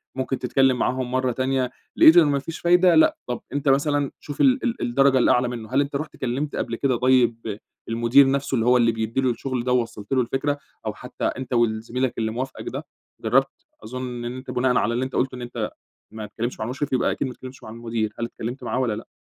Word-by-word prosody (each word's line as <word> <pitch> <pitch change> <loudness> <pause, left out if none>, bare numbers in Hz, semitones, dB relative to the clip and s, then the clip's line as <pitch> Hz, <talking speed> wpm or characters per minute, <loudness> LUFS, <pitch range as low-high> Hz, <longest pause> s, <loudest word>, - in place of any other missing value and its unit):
ممكن 130 0 -2
تتكلّم 130 0 +2
معاهم 130 -1 -1
مرّة 130 0 +1
تانية، 130 0 -1 0.2
لقيت 160 +2 +8
إن 165 -3 +7
ما 140 -1 +1
فيش 160 +4 -7
فايدة 175 0 +5
لأ 160 - +5
طب 125 - -3
أنت 145 0 0
مثلًا 145 0 +2
شوف 145 - -5
ال 265 -1 +4
ال 240 -1 -1
الدرجة 135 +2 +3
الأعلى 125 0 +3
منّه، 115 -3 -6
هل 140 - +4
أنت 140 0 -3
رُحت 155 +3 -4
كلمت 135 +4 -2
قبل 115 - -2
كده 130 +1 +1
طيّب 120 -4 +2 0.3
المدير 120 +4 +4
نفسه 140 0 -1
اللي 115 -2 +1
هو 125 +1 +5
اللي 115 -1 +4
بيدّي 115 +3 -2
له 130 - +2
الشغل 125 +1 -3
ده 125 - -1
ووصّلت 115 -4 -1
له 130 - +3
الفكرة، 135 +4 -1 0.3
أو - - -2
حتّى - - -6
أنت 130 0 -3
وال 115 -2 +2
زميلك 125 +2 -1
اللي 110 -1 -1
موافقك 130 +4 -5
ده، - - -6 0.4
جرّبت؟ - - +1 0.2
أظن 125 +1 -5
إن 120 +2 -4
أنت 130 0 -7
بناءً 125 0 +2
على 115 - +1
اللي 125 +2 0
أنت 130 - -7
قلته 130 0 0
إن 125 - -8
أنت 120 -3 -4 0.4
ما 110 0 -6
تكلمتش 115 +4 -5
مع 110 - -2
المشرف 130 +4 -3
يبقى 130 - +2
أكيد - - -2
ما 125 - -6
تكلمتش 130 +1 -11
مع - - -9
المدير، 115 -1 -3
هل 115 - -1
اتكلمت 120 +2 -6
معاه - - -1
والّا 125 -4 0
لأ؟ 110 - -9
125 Hz, 230 wpm, -23 LUFS, 120-135 Hz, 0.4 s, لقيت